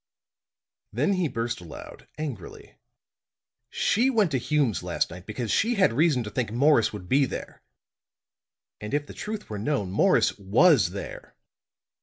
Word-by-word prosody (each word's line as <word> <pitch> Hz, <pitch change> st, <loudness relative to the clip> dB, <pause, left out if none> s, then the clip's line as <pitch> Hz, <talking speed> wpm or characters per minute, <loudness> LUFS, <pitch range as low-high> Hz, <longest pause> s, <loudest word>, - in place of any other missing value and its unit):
Then 200 Hz, -, +1 dB
he 185 Hz, -3 st, 0 dB
burst 120 Hz, -4 st, -3 dB
out -, -, -11 dB
aloud, 75 Hz, -, -11 dB
angrily. 140 Hz, -, -7 dB, 1.0 s
"She 235 Hz, +8 st, +1 dB
went 215 Hz, -9 st, +2 dB
to 130 Hz, -, +1 dB
Hume's 130 Hz, -3 st, 0 dB
last 90 Hz, -1 st, -2 dB
night 90 Hz, +1 st, -11 dB
because 110 Hz, 0 st, -4 dB
she 235 Hz, -, +2 dB
had 190 Hz, -, +3 dB
reason 145 Hz, -2 st, +2 dB
to 105 Hz, -, -7 dB
think 115 Hz, 0 st, -2 dB
Morris 125 Hz, 0 st, +3 dB
would 100 Hz, -4 st, -8 dB
be 135 Hz, +5 st, +3 dB
there. -, -, -7 dB, 1.2 s
And 105 Hz, +6 st, -4 dB
if 145 Hz, 0 st, -1 dB
the -, -, -11 dB
truth 210 Hz, 0 st, -6 dB
were 105 Hz, -2 st, -5 dB
known, 105 Hz, -5 st, -1 dB
Morris 100 Hz, -, +2 dB
was 110 Hz, -, +4 dB
there." 100 Hz, +2 st, -8 dB
125 Hz, 155 wpm, -26 LUFS, 105-155 Hz, 1.2 s, was